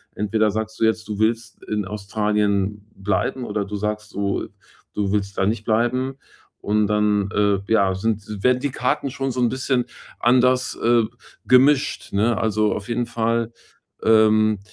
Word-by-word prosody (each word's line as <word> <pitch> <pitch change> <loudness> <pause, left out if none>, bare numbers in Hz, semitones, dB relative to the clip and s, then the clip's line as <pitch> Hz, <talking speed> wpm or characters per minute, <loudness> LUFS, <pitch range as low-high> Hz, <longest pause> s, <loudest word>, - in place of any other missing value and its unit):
entweder 105 +1 +1
sagst 110 +1 -4
du 115 - +3
jetzt, 110 0 0
du 105 0 -4
willst 110 0 -1
in 105 -1 -2
Australien 105 0 -1
bleiben 105 +6 -1
oder 105 -2 -2
du 105 +1 -6
sagst, 105 +1 -4
du 100 0 -2 0.5
du 100 -2 -1
willst 100 -1 -2
da 95 - +2
nicht 110 +1 -1
bleiben 125 +4 0 0.4
und 105 0 +1
dann, 105 -1 +1
äh, 100 -1 +2
ja, 100 -3 +3
sind 105 0 -3
werden 125 0 +3
die 145 - -1
Karten 135 +3 -1
schon 135 0 -3
so 125 +1 -2
'n 120 - +3
bisschen 130 -1 0 0.4
anders, 125 +1 +3
äh, 120 0 +4 0.4
gemischt, 135 +1 +3
ne? 110 +2 +2
Also, 110 -1 +1
auf 105 - -6
jeden 120 0 -1
Fall, 115 0 -1 0.5
ähm, 110 -1 +4
110 Hz, 160 wpm, -22 LUFS, 105-120 Hz, 0.5 s, äh